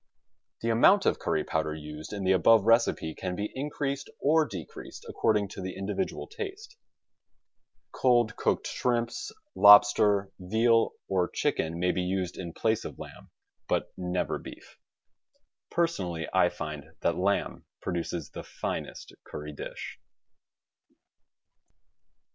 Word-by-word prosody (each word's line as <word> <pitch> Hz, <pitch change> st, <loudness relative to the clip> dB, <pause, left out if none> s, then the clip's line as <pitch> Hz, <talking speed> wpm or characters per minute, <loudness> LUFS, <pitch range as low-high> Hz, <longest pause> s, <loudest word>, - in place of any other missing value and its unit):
The 115 Hz, -, 0 dB
amount 190 Hz, -, +5 dB
of -, -, +2 dB
curry -, -, 0 dB
powder 80 Hz, -1 st, -1 dB
used 75 Hz, 0 st, -8 dB
in 100 Hz, -2 st, -4 dB
the 95 Hz, -, +3 dB
above 100 Hz, +4 st, +5 dB
recipe 115 Hz, -8 st, +2 dB
can 90 Hz, +1 st, -4 dB
be 105 Hz, +3 st, -3 dB
increased 140 Hz, 0 st, -3 dB
or 155 Hz, +2 st, +3 dB
decreased -, -, -9 dB
according 105 Hz, -3 st, +1 dB
to 95 Hz, -, -8 dB
the 95 Hz, 0 st, -5 dB
in 95 Hz, -, -4 dB
dividual 180 Hz, -, -2 dB
taste. 435 Hz, 0 st, -7 dB, 1.2 s
Cold 120 Hz, -4 st, +2 dB
cooked -, -, 0 dB
shrimps, 120 Hz, -1 st, -1 dB, 0.2 s
lobster, 105 Hz, -, +6 dB
veal 115 Hz, +5 st, +2 dB
or 90 Hz, -2 st, +1 dB
chicken 80 Hz, +1 st, -1 dB
may 90 Hz, +1 st, +2 dB
be 90 Hz, -, -1 dB
used 90 Hz, -1 st, -2 dB
in 85 Hz, -3 st, -6 dB
place 110 Hz, +5 st, 0 dB
of -, -, -7 dB
lamb; -, -, -11 dB, 0.4 s
but -, -, -1 dB
never 90 Hz, -1 st, -2 dB
beef. -, -, -12 dB, 0.9 s
Personally 90 Hz, -, -1 dB
I 95 Hz, -1 st, +4 dB
find 75 Hz, -4 st, -7 dB
that 85 Hz, -, +1 dB
lamb 100 Hz, +3 st, -1 dB
produces 85 Hz, -3 st, -4 dB
the -, -, -7 dB
finest -, -, -6 dB
curry 75 Hz, 0 st, -7 dB
dish. -, -, -7 dB
100 Hz, 130 wpm, -28 LUFS, 90-120 Hz, 1.2 s, lobster